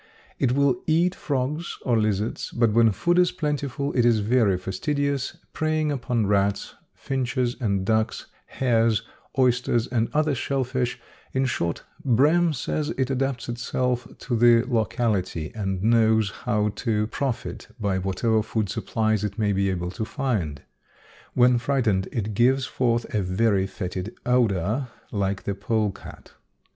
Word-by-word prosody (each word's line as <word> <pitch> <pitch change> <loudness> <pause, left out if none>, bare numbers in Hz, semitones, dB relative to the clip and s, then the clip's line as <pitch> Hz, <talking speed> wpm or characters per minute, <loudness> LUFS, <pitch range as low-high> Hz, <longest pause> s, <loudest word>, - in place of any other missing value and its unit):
It 125 -3 +2
will 140 -2 +2
eat 170 +3 +3
frogs 145 +3 -3
or 120 - +2
lizards, 105 0 0
but 115 -3 +1
when 115 -1 +5
food 175 - +1
is 180 -1 +4
plentiful 145 -4 -2
it 120 - +3
is 120 -2 +4
very 105 -3 +3
fastidious, 140 +9 -2 0.2
preying 155 -1 0
upon 120 -5 0
rats, 100 0 +1 0.2
finches 130 -2 -1
and 100 -4 0
ducks, 110 +1 0 0.2
hares, 115 -4 +1 0.3
oysters 125 -2 +2
and 115 -3 0
other 155 0 +2
shell 135 +1 -1
fish; 125 -1 -2 0.3
in 130 0 +1
short, 85 -9 -2 0.2
Brehm 150 +7 +4
says 150 +2 -2
it 130 0 0
adapts 135 -2 -1
itself 125 +1 -1
to 125 - -3
the 115 0 +5
locality 110 - -1
and 95 -3 -3
knows 110 -2 +3
how 105 -2 0
to 105 -4 0
profit 125 +2 -4
by 100 -3 0
whatever 105 +4 +1
food 105 -1 -2
supplies 110 +1 0
it 100 -1 -3
may 105 -2 +1
be 100 0 +1
able 90 -1 -2
to 110 - -4
find. 105 - -2 0.7
When 125 0 +5
frightened 115 -7 0
it 110 -2 -2
gives 130 +5 +3
forth 120 -3 0
a 105 - +1
very 95 +1 +1
fetid 95 +1 -5
odor 115 0 +1 0.2
like 100 -2 -1
the 100 - -2
polecat. 105 0 -3
115 Hz, 145 wpm, -25 LUFS, 105-130 Hz, 0.7 s, when